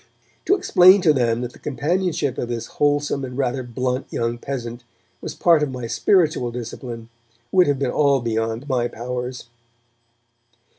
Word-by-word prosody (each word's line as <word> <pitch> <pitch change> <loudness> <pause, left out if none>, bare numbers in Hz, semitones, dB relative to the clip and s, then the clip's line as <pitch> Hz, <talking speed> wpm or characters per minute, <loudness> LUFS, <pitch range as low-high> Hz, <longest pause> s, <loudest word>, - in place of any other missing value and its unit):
To 390 - +4
explain 185 - +6
to 160 -4 +4
them 120 -3 +1
that 125 0 -5
the - - -16
companionship 150 -1 -1
of 120 - -2
this 120 -2 -3 0.2
wholesome 145 -1 +1
and 125 -1 -6
rather 130 -1 -1
blunt 125 +2 -3
young 115 0 -2
peasant 120 -3 -5 0.4
was - - -6
part 165 -3 +4
of 150 - 0
my 125 -2 -5
spiritual 155 - +2
discipline 120 -1 -7 0.4
would 180 -1 +4
have 145 -1 +1
been 130 -2 -1
all 140 -2 +3
beyond 115 +2 -2
my 125 -3 0
powers. 125 +1 -5
130 Hz, 155 wpm, -22 LUFS, 120-145 Hz, 0.4 s, explain